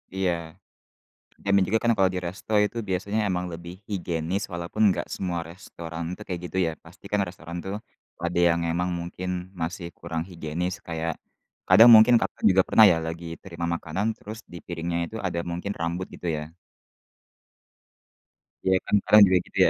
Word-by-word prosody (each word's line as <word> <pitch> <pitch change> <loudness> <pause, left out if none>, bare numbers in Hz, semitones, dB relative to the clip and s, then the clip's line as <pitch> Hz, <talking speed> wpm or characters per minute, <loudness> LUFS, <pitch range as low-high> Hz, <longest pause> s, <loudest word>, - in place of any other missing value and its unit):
Iya. 95 -2 +1 1.1
Dan 100 - 0
na - - +2
juga 110 +3 +3
kan, 120 - +4
kalau 95 -1 +5
di 95 - -4
resto 100 +4 -6
itu 115 - -5
biasanya 100 +4 -1
emang 90 -1 -1
lebih 85 +1 -8 0.2
higienis, 90 0 -2
walaupun 85 +5 -4 0.2
gak - - -3
semua 90 -3 -2
restoran, 85 -1 -8
itu, 105 - -15
kayak 90 -2 -3
gitu 95 - -5
ya, - - -1
pasti 90 +4 -17
kan 105 - +2
restoran 85 -1 -8
tuh, 95 +1 -3 0.5
ada 85 0 0
yang 85 0 +1
emang 90 +2 0
mungkin 90 +1 -5
masih 85 +1 -4
kurang 80 0 -4
higienis 85 0 -4
kayak 80 0 -3 0.5
kadang 115 +2 +9
mungkin 110 +3 +8
Kakak - - -3
juga 95 0 +5
pernah 110 - +7
ya, 80 - +2
lagi 85 +1 -5 0.2
terima 85 -2 -5
makanan 95 +8 -2
terus 110 +2 -9
di 90 - -8
piringnya 85 0 -3
itu, - - -8
ada, 85 -1 -2
mungkin 90 +4 -3
rambut 85 +2 -2
gitu 90 - -6
ya? 75 +3 -8 2.1
Iya 95 0 +5
kan, - - +2
kadang 105 - +7
juga, 90 0 +4
gitu - - -11
ya? - - +5
90 Hz, 175 wpm, -26 LUFS, 85-95 Hz, 2.1 s, kadang